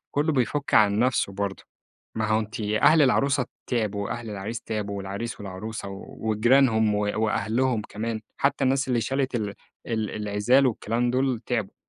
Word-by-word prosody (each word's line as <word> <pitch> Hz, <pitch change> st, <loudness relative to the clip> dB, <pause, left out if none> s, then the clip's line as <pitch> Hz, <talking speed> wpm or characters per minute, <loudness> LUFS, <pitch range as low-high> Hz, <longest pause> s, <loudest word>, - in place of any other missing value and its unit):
كلّه 150 Hz, +3 st, +2 dB
بيفُك 140 Hz, +2 st, 0 dB
عن 105 Hz, -1 st, +5 dB
نفْسه 120 Hz, -5 st, +1 dB
برضو، 100 Hz, 0 st, -3 dB, 0.5 s
ما 110 Hz, -1 st, 0 dB
هو 110 Hz, +1 st, +2 dB
أنتِ 110 Hz, +1 st, -6 dB
أهل 110 Hz, +9 st, +4 dB
العروسة 135 Hz, -1 st, +2 dB, 0.2 s
تعبوا 105 Hz, -4 st, -1 dB
وأهل 115 Hz, +2 st, -5 dB
العريس 105 Hz, +3 st, -5 dB
تعبوا 100 Hz, -2 st, -3 dB
والعريس 100 Hz, +5 st, -5 dB
والعروسة 100 Hz, +2 st, -6 dB
وجيرانهم 110 Hz, +2 st, +2 dB
و 105 Hz, -, 0 dB, 0.2 s
وأهلهم 110 Hz, +2 st, +1 dB
كمان، 110 Hz, +1 st, -3 dB, 0.2 s
حتّى 140 Hz, -, +1 dB
الناس 135 Hz, +1 st, +1 dB
اللي 120 Hz, -2 st, +2 dB
شالت 135 Hz, +2 st, -1 dB
ال 105 Hz, -3 st, -3 dB, 0.3 s
ال 110 Hz, -3 st, -1 dB
العزال 105 Hz, +6 st, +2 dB
والكلام 120 Hz, 0 st, 0 dB
دُول 130 Hz, -2 st, 0 dB
تعبوا، 115 Hz, -6 st, -2 dB
110 Hz, 150 wpm, -25 LUFS, 105-125 Hz, 0.5 s, عن